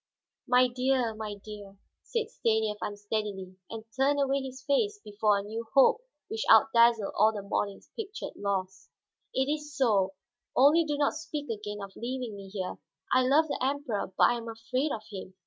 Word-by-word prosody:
"My 250 Hz, 0 st, +5 dB
dear, 250 Hz, -1 st, 0 dB
my 215 Hz, -1 st, -5 dB
dear," 205 Hz, -1 st, -11 dB, 0.2 s
said 455 Hz, -2 st, -3 dB
Stanief 220 Hz, -, 0 dB
unsteadily, 205 Hz, -2 st, -4 dB
and 225 Hz, -1 st, -7 dB
turned 280 Hz, +2 st, +2 dB
away 275 Hz, 0 st, +1 dB
his 265 Hz, 0 st, -8 dB
face 410 Hz, +10 st, +1 dB
before 210 Hz, 0 st, +1 dB
a 200 Hz, -, -3 dB
new 225 Hz, +2 st, -6 dB
hope 445 Hz, -, +6 dB, 0.3 s
which 440 Hz, +3 st, -3 dB
out 275 Hz, -, +7 dB
dazzled 230 Hz, -3 st, +4 dB
all 215 Hz, +2 st, +5 dB
the 205 Hz, -2 st, -6 dB
morning's 200 Hz, 0 st, -3 dB
pictured 425 Hz, -2 st, -6 dB
loss. 190 Hz, -2 st, -3 dB, 0.4 s
"It 265 Hz, -, +1 dB
is 295 Hz, 0 st, -3 dB
so, 200 Hz, -7 st, +2 dB, 0.4 s
only 300 Hz, +5 st, +6 dB
do 295 Hz, -1 st, -1 dB
not 285 Hz, -1 st, +2 dB
speak 305 Hz, -3 st, -5 dB
again 210 Hz, -1 st, -5 dB
of 195 Hz, -1 st, -9 dB
leaving 245 Hz, -2 st, -4 dB
me 195 Hz, -1 st, -10 dB
here. 190 Hz, -2 st, -5 dB, 0.3 s
I 255 Hz, -, +5 dB
love 305 Hz, +4 st, +4 dB
the -, -, -3 dB
Emperor, 265 Hz, -8 st, -1 dB
but -, -, +4 dB
I 240 Hz, -, +5 dB
am 230 Hz, -1 st, -7 dB
afraid 255 Hz, +6 st, -2 dB
of 215 Hz, -, -4 dB
him. 190 Hz, -1 st, -8 dB
230 Hz, 180 wpm, -29 LUFS, 205-275 Hz, 0.4 s, out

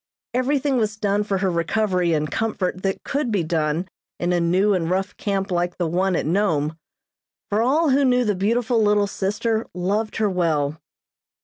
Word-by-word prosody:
Everything 270 Hz, +2 st, +1 dB
was 215 Hz, -2 st, 0 dB
done 205 Hz, -1 st, +1 dB
for 200 Hz, -2 st, -1 dB
her 190 Hz, -1 st, 0 dB
recovery 180 Hz, +1 st, 0 dB
and 150 Hz, -2 st, 0 dB
comfort 190 Hz, -5 st, -2 dB
that 195 Hz, 0 st, -2 dB
could 280 Hz, -4 st, -1 dB
be 200 Hz, -5 st, +1 dB
done 160 Hz, +1 st, -1 dB, 0.3 s
in 175 Hz, +1 st, 0 dB
a 175 Hz, -, +2 dB
new 185 Hz, +5 st, +2 dB
and 170 Hz, -3 st, 0 dB
rough 190 Hz, +2 st, -1 dB
camp 195 Hz, -1 st, -2 dB
like 175 Hz, 0 st, -1 dB
the 175 Hz, -, 0 dB
one 180 Hz, +3 st, +1 dB
at -, -, -1 dB
Nome; 160 Hz, -4 st, +1 dB, 0.8 s
for 210 Hz, +2 st, +2 dB
all 290 Hz, +5 st, +3 dB
who 280 Hz, +2 st, +3 dB
knew 250 Hz, -2 st, +3 dB
the 210 Hz, -, +2 dB
beautiful 225 Hz, +4 st, +1 dB
little 210 Hz, -1 st, +3 dB
sister 210 Hz, +3 st, -1 dB
loved 205 Hz, +5 st, -1 dB
her 220 Hz, -, +1 dB
well. 160 Hz, -5 st, 0 dB
195 Hz, 180 wpm, -22 LUFS, 175-220 Hz, 0.8 s, all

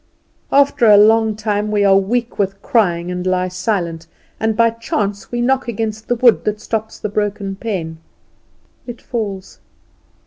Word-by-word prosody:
After 280 Hz, -3 st, +3 dB
a 210 Hz, -1 st, +8 dB
long 220 Hz, +1 st, +4 dB
time 210 Hz, -1 st, -2 dB
we 205 Hz, -1 st, +1 dB
are 195 Hz, -1 st, +5 dB
weak 230 Hz, +5 st, -1 dB
with 195 Hz, 0 st, -1 dB
crying, 180 Hz, -9 st, +1 dB
and 180 Hz, 0 st, -3 dB
lie 185 Hz, 0 st, 0 dB
silent, 180 Hz, -4 st, -3 dB, 0.3 s
and 220 Hz, -1 st, 0 dB
by 230 Hz, 0 st, +4 dB
chance 210 Hz, -3 st, -3 dB
we 240 Hz, 0 st, -2 dB
knock 260 Hz, +1 st, +1 dB
against 220 Hz, -1 st, -4 dB
the 245 Hz, -, +1 dB
wood 240 Hz, -1 st, +4 dB
that 210 Hz, 0 st, -1 dB
stops 220 Hz, 0 st, -4 dB
the -, -, -4 dB
broken 205 Hz, -1 st, -2 dB
pane. 180 Hz, -7 st, -5 dB, 0.9 s
It 240 Hz, -1 st, -7 dB
falls. 200 Hz, -5 st, -5 dB
210 Hz, 160 wpm, -18 LUFS, 195-230 Hz, 0.9 s, a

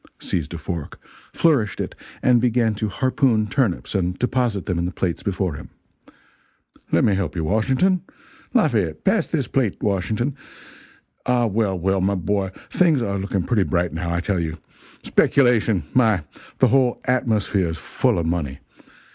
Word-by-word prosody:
seized 80 Hz, -4 st, -3 dB
a 85 Hz, -, -5 dB
fork, 80 Hz, -1 st, -6 dB, 0.3 s
flourished 135 Hz, -, +2 dB
it -, -, -3 dB, 0.3 s
and 125 Hz, -2 st, +4 dB
began 115 Hz, -2 st, +2 dB
to 105 Hz, 0 st, -2 dB
harpoon 130 Hz, 0 st, +1 dB
turnips 105 Hz, -3 st, -1 dB
and 90 Hz, -2 st, -1 dB
deposit 125 Hz, -6 st, 0 dB
them 90 Hz, -2 st, -1 dB
in 85 Hz, -, 0 dB
the 90 Hz, -, -2 dB
plates 90 Hz, -1 st, -2 dB
before 95 Hz, -3 st, -1 dB
him 70 Hz, -, -9 dB, 1.2 s
"Let 85 Hz, -, +3 dB
me 105 Hz, -, +4 dB
help 95 Hz, -6 st, -2 dB
you, 85 Hz, -, -1 dB
Washington 130 Hz, -, +2 dB, 0.5 s
Lafayette, 105 Hz, -, +1 dB
pass -, -, +2 dB
this -, -, -1 dB
plate -, -, 0 dB
to -, -, -4 dB
Washington 105 Hz, +7 st, -1 dB, 0.9 s
ah, 125 Hz, -1 st, +3 dB
well, 105 Hz, -3 st, 0 dB
well, 95 Hz, +2 st, 0 dB
my 100 Hz, +2 st, +1 dB
boy, 95 Hz, +2 st, -1 dB, 0.2 s
things 160 Hz, -9 st, +3 dB
are 100 Hz, -2 st, -2 dB
looking 95 Hz, -1 st, -1 dB
pretty 110 Hz, +2 st, +1 dB
bright, 90 Hz, -3 st, 0 dB
now, 85 Hz, +1 st, -3 dB
I 85 Hz, 0 st, 0 dB
tell 95 Hz, 0 st, -1 dB
you. 80 Hz, -1 st, -3 dB, 0.5 s
Speculation 115 Hz, -7 st, +3 dB
my! 110 Hz, -9 st, +3 dB, 0.3 s
the -, -, +4 dB
whole 130 Hz, -2 st, +2 dB
atmosphere's 105 Hz, -9 st, 0 dB
full -, -, 0 dB
of 85 Hz, -, -1 dB
money. 80 Hz, -5 st, -2 dB
100 Hz, 160 wpm, -22 LUFS, 90-120 Hz, 1.2 s, and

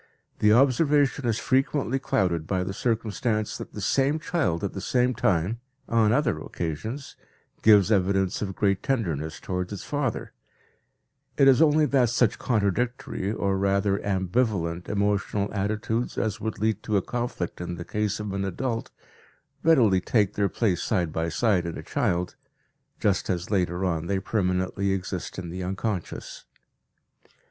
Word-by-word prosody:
The 105 Hz, -, +4 dB
observation 140 Hz, +2 st, +3 dB
is 115 Hz, -2 st, +1 dB
frequently 135 Hz, 0 st, +1 dB
clouded 85 Hz, -10 st, 0 dB
by 95 Hz, -2 st, 0 dB
the 95 Hz, +1 st, -4 dB
circumstance 110 Hz, 0 st, -1 dB
that -, -, -8 dB
the 105 Hz, -, -6 dB
same 135 Hz, +8 st, +2 dB
child 155 Hz, -, -1 dB
at 100 Hz, -, -2 dB
the 95 Hz, -, -5 dB
same 125 Hz, +3 st, +1 dB
time, 105 Hz, -3 st, +1 dB, 0.3 s
on 115 Hz, -2 st, +3 dB
other 125 Hz, -1 st, +1 dB
occasions, 110 Hz, -, -5 dB, 0.5 s
gives 105 Hz, -2 st, +6 dB
evidence 95 Hz, -1 st, +1 dB
of 95 Hz, -3 st, -3 dB
great 100 Hz, -2 st, +1 dB
tenderness 85 Hz, -, -2 dB
towards 90 Hz, 0 st, -3 dB
its 100 Hz, -2 st, -6 dB
father; 145 Hz, -6 st, -2 dB, 1.0 s
it 135 Hz, -, +6 dB
is 135 Hz, +2 st, +6 dB
only 155 Hz, -1 st, +5 dB
that 130 Hz, -5 st, +3 dB
such 120 Hz, -2 st, +2 dB
contradictory, 110 Hz, -2 st, -1 dB
or 100 Hz, -3 st, 0 dB
rather, 100 Hz, 0 st, +1 dB
ambivalent 95 Hz, -3 st, -1 dB
emotional 100 Hz, 0 st, 0 dB
attitudes 110 Hz, +3 st, -2 dB
as 110 Hz, -2 st, -1 dB
would 110 Hz, -1 st, -3 dB
lead 110 Hz, -1 st, 0 dB
to 105 Hz, -2 st, 0 dB
a 95 Hz, -, 0 dB
conflict 120 Hz, -9 st, -4 dB
in 90 Hz, 0 st, -4 dB
the 85 Hz, 0 st, -7 dB
case 105 Hz, 0 st, -1 dB
of 105 Hz, -2 st, -4 dB
an 100 Hz, 0 st, -1 dB
adult 115 Hz, +5 st, -3 dB, 0.7 s
readily 115 Hz, -, +4 dB
take 105 Hz, -1 st, +1 dB
their 100 Hz, -1 st, +1 dB
place 100 Hz, -7 st, 0 dB
side 90 Hz, -8 st, 0 dB
by 80 Hz, +1 st, -1 dB
side 95 Hz, -1 st, +1 dB
in 85 Hz, -, -5 dB
a -, -, -7 dB
child, 90 Hz, 0 st, -1 dB, 0.6 s
just 100 Hz, -3 st, +1 dB
as 90 Hz, +1 st, -2 dB
later 90 Hz, -2 st, 0 dB
on 85 Hz, -2 st, -1 dB
they 100 Hz, -, 0 dB
permanently 95 Hz, 0 st, 0 dB
exist 95 Hz, -1 st, -4 dB
in 90 Hz, -2 st, -5 dB
the 90 Hz, +1 st, -5 dB
unconscious. 95 Hz, 0 st, -4 dB
100 Hz, 155 wpm, -26 LUFS, 95-120 Hz, 1.0 s, gives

